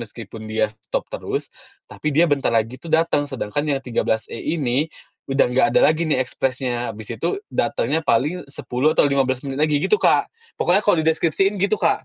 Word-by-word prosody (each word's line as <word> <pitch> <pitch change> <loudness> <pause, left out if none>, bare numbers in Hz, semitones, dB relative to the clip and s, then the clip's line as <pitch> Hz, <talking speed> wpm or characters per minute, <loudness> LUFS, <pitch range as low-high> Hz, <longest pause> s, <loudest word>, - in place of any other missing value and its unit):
meskipun 110 -1 -9
dia 110 -1 0
stop 110 -1 -5
terus, - - -4 0.4
tapi 155 - -4
dia 160 +4 +5
bentar 145 -4 +1
lagi 115 +2 0
tuh 170 - -10
datang, 160 -3 +2
sedangkan 135 +1 -3
yang - - -4
13E 115 -2 -2 0.2
ini 140 +1 0 0.4
udah 135 +1 +3
nggak 125 +1 +3
ada - - +7
lagi 160 +2 +2
nih 155 - +2
ekspresnya, 125 -1 -2
habis 110 0 -8
itu 400 - -2 0.2
datangnya - - 0
paling 155 +4 0
10 140 +2 -1
atau - - +5
15 130 -2 +1
menit 135 -1 -4
lagi," 150 -1 +3
gitu, 425 - +3
Kak. - - +3 0.3
Pokoknya 180 +3 +4
kalau 205 - +4
dideskripsiin 165 +5 +1
gitu, 200 +2 +2
Kak - - +1
140 Hz, 180 wpm, -21 LUFS, 120-160 Hz, 0.4 s, ada